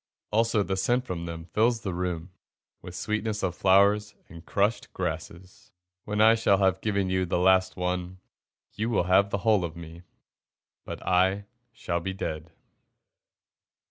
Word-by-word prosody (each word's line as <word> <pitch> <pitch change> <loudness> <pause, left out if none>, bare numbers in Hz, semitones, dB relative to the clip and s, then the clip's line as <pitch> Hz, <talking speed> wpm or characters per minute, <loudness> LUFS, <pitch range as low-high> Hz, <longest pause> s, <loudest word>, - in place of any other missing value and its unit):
Also 110 -1 +2
the 95 - -2
scent 120 +6 +1
from 85 -4 -5
them 80 -1 -7
fills 115 +6 +1
the 95 - -4
room 90 0 -3 0.5
With 90 0 -9
sweetness 105 0 -2
of 90 - 0
flowers 100 +2 +3
and 85 0 -12
crushed 105 +5 -1
grasses. 90 +1 -6 0.3
When 105 0 -3
I 110 +1 +7
shall 110 -3 +3
have 95 -1 +1
given 100 -3 0
you 95 0 +1
the 85 - 0
last 95 +1 +3
one, 90 0 -3 0.6
You 110 +2 -2
will 110 - +1
have 95 +2 +3
the 100 - -1
whole 105 -4 +4
of 85 -2 -5
me, 85 0 -10 0.8
But - - -8
I 95 +2 +2 0.3
shall 85 -6 -3
be 95 +3 -4
dead. 80 -3 -5
95 Hz, 155 wpm, -27 LUFS, 90-105 Hz, 0.8 s, I